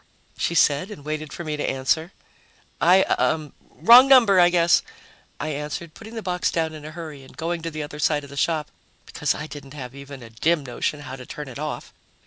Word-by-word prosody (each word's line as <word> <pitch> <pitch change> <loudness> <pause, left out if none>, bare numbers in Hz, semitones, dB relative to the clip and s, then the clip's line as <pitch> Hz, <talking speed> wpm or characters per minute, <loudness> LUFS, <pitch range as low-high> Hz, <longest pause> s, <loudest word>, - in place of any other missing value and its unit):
she 170 - -1
said, 150 +4 +3
and 150 -9 -10
waited 155 -1 -4
for 175 - -6
me 155 -2 -3
to 150 - -2
answer. 160 +6 0 0.7
"I 185 +3 +6
uh 155 -2 0 0.2
wrong 245 +3 +7
number, 235 -8 +6
I 175 0 +7
guess," 170 -1 +4 0.6
I 155 - -3
answered, 150 +2 -5
putting 225 +1 -11
the 225 - -5
box 180 -1 0
down 160 -1 -1
in 155 -1 -9
a 155 - -7
hurry 155 -3 -8
and 130 - -16
going 170 +1 -2
to 165 - -4
the 155 -1 -5
other 150 0 -8
side 150 -1 +1
of 140 - -12
the - - -9
shop 155 +1 0 0.3
because - - -1
I 150 - -5
didn't 145 -2 -10
have 125 -3 -7
even 140 -2 -10
a 115 - -12
dim 150 +6 +1
notion 135 +4 -3
how 130 -2 -8
to 125 - -10
turn 150 -1 -7
it 130 +1 -9
off. 155 0 -5
155 Hz, 220 wpm, -23 LUFS, 145-170 Hz, 0.7 s, wrong